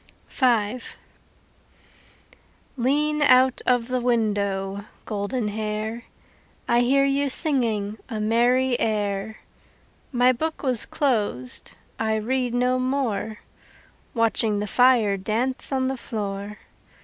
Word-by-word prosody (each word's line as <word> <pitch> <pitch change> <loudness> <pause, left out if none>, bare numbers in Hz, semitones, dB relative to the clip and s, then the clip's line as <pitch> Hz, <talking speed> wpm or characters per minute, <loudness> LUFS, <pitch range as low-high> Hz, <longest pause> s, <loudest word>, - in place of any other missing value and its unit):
V 240 -3 +1 2.0
Lean 295 +4 +1
out 260 -2 +4
of 245 -2 +2
the 255 -1 -1
window, 200 -4 -1 0.2
Goldenhair, 215 +1 -3 0.6
I 235 - +3
hear 275 +3 +3
you 280 +1 +1
singing 225 -8 +1
A 220 -3 -4
merry 240 +4 +2
air. 210 -1 -2 0.7
My 250 -1 +4
book 315 +6 -3
was 255 -5 0
closed, 210 - -2 0.3
I 220 -1 0
read 245 +2 -1
no 250 +1 +1
more, 255 -5 -2 0.7
Watching 225 -2 +1
the 205 - -2
fire 230 -3 +3
dance 230 +9 0
On 260 -1 0
the 265 0 -2
floor. 205 -2 -5
235 Hz, 100 wpm, -24 LUFS, 210-255 Hz, 2.0 s, out